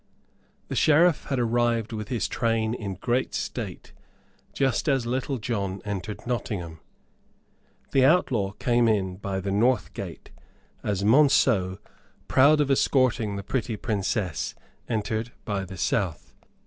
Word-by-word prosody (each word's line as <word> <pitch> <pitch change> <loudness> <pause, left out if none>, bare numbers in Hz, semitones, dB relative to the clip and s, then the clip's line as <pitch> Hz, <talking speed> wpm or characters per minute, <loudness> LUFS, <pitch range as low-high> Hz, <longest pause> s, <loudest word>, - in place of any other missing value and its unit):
The - - -4
Sheriff 160 +1 +4
had 135 - -2
arrived 120 -1 +1
with 110 -1 -4
his 120 -1 -1
train 115 -1 0
in 100 -5 -4
great 120 +7 -1
state, - - -5 0.6
just 135 +3 0
as 135 -4 +1
Little 130 +3 -1
John 100 -5 -3
entered 105 +1 -5
Nottingham. 100 -9 -3 1.1
The 135 - +4
outlaw 125 - +2
came 120 +1 +2
in 95 -4 0
by 95 -1 -3
the 100 +1 -3
north 120 +4 +2
gate, - - -8 0.5
as 100 -2 -1
Monceux, 110 -6 +4 0.5
proud 145 +4 +5
of 145 -2 +2
escorting 130 -6 +2
the 100 - -5
pretty 115 -2 -2
Princess, 100 - -2 0.3
entered 110 +1 -2
by 100 -2 -2
the 95 0 -9
south. 90 -3 -1
115 Hz, 130 wpm, -26 LUFS, 100-125 Hz, 1.1 s, proud